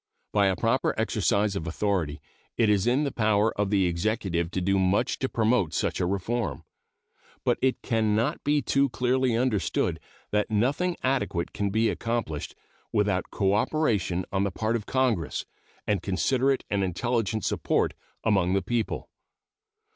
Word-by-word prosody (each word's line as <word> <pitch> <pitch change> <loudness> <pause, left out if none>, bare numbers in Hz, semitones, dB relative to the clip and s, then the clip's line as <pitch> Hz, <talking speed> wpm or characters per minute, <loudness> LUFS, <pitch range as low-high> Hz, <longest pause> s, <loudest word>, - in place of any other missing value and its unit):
By 100 -1 +4
a 95 - +2
proper - - 0
exercise 100 0 +1
of 85 -4 -3
authority 85 -4 -1 0.4
it 115 -2 +3
is 100 0 +2
in 130 +5 +3
the 140 - -1
power 110 -1 +2
of 105 -1 0
the 100 -2 +3
Executive 85 -1 -1
to 95 - -2
do 95 +2 +1
much 95 +7 +1
to 130 - -1
promote 110 -7 +1
such - - 0
a 90 - +1
reform. 105 +5 -2 0.8
But - - +2
it 130 0 +1
can 110 -2 +1
not 115 +2 0
be 145 -1 +2
too 140 +2 +2
clearly 125 -1 +1
understood 120 -5 0 0.3
that 105 +1 +1
nothing 135 - +1
adequate 130 -10 0
can 100 -1 -1
be 110 +3 +2
accomplished 115 -13 -3 0.4
without 100 -3 +1
cooperation 100 - +1
on 95 0 +1
the 100 - +1
part 110 +4 -1
of 110 -3 -4
Congress 120 - 0 0.4
and 105 -4 0
considerate 130 +8 +1
and 100 -1 0
intelligent 110 +3 -1
support - - +1 0.3
among 95 -4 +2
the 95 - +1
people. 120 -2 -2
105 Hz, 155 wpm, -27 LUFS, 95-120 Hz, 0.8 s, By